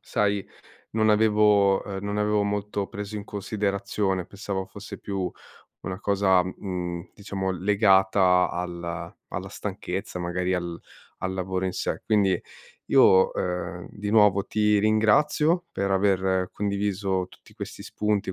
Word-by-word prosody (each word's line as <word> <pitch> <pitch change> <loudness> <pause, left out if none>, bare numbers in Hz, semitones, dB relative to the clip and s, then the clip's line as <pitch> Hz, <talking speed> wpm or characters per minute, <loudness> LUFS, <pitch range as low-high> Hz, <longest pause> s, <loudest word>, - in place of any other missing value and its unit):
sai 105 -3 0 0.4
non 110 0 +2
avevo 105 -2 +4
uhm, 100 -1 -5
non 100 0 -2
avevo 105 0 +2
molto 100 0 -2
preso 105 +1 -6
in 100 - -5
considerazione, 100 -2 -2
pensavo 100 -2 -4
fosse 100 +2 -9
più 95 -3 -3 0.5
una 95 +1 -5
cosa, 100 -3 +3
mhmm, 90 -1 -5
diciamo 95 -2 -3
legata 95 -1 +4
al 85 -1 -5
alla - - -5
stanchezza, 90 0 -5
magari 90 +1 -1
al 85 -2 -3 0.4
al 95 - -2
lavoro 95 0 -2
in 95 - -1
sé. - - -2
Quindi 100 -4 +2 0.5
io, 95 0 +6
uhm, 90 0 -3
di 105 0 -5
nuovo 105 -3 +5
ti 105 -1 +2
ringrazio 145 - +3
per 100 0 -1
aver 95 -1 +2
condiviso 100 -2 -1
tutti - - -19
questi - - -7
spunti, 105 -2 -1
100 Hz, 130 wpm, -26 LUFS, 95-105 Hz, 0.5 s, io